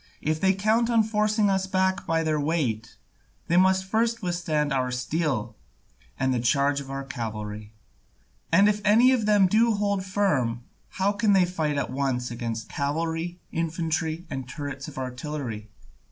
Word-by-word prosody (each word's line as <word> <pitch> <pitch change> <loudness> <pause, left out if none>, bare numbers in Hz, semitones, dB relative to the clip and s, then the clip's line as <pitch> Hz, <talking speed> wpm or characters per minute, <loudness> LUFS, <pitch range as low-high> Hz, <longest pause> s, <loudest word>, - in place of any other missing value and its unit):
If 155 +1 -1
they 190 0 +3
count 220 +4 +2
on 230 -2 +4
forcing 215 0 +1
us 190 -1 +1
back 190 0 0
by 165 0 +1
their 155 -1 0
weigh, 145 -8 0 0.7
they 170 - +1
must 190 +1 +4
first 230 +3 0
withstand 160 -5 -1
our 130 -1 0
steel 125 -3 -2 0.6
and 130 0 +1
the 125 - 0
charge 140 +4 +2
of 135 - -10
our 135 0 -4
cavalry. 110 -5 -6 0.8
And 195 +5 +6
if 210 0 +1
any 225 +5 +5
of 235 -5 +1
them 205 -2 +5
do 225 +5 +3
hold 200 -2 0
firm, 150 - 0 0.3
how 195 +2 0
can 205 0 +2
they 190 -2 +5
fight 160 -5 -2
at 140 - -2
once 130 -3 -1
against 115 -1 -4
cavalry, 165 +4 -2
infantry, 165 0 -2
and 135 -5 -6
turrets 145 -2 -6
of - - -10
artillery? 125 -4 -5
160 Hz, 160 wpm, -26 LUFS, 135-195 Hz, 0.8 s, And